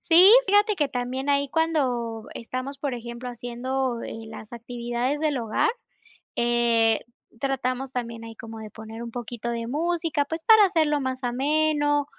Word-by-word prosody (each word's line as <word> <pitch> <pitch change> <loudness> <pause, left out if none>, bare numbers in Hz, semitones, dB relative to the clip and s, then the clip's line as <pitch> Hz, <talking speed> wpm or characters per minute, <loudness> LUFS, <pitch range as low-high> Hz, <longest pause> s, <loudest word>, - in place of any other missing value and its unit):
Sí, 365 +5 +8
fíjate 410 +2 +4
que 295 -5 +1
también 260 +2 -3
ahí 280 0 +2
cuando 255 -9 0
estamos, 255 +4 -5
por 280 -4 -2
ejemplo, 235 +1 -7
haciendo 245 +1 -3
eh, 225 0 -7
las 220 0 -10
actividades 240 +4 -3
del 300 -4 +1
hogar, 230 - +1 0.7
eh, 235 -2 +3 0.4
tratamos 265 0 -2
también 235 -2 -4
ahí 225 0 -9
como 225 0 -9
de 215 -2 -9
poner 220 +1 -9
un 235 - -7
poquito 240 -1 -5
de 230 -1 -3
música, 325 +1 0
pues 320 +2 -5
para 440 -2 +7
hacerlo 315 -6 +2
más 260 -1 -3
ameno, 290 +3 +1
255 Hz, 155 wpm, -25 LUFS, 235-290 Hz, 0.7 s, Sí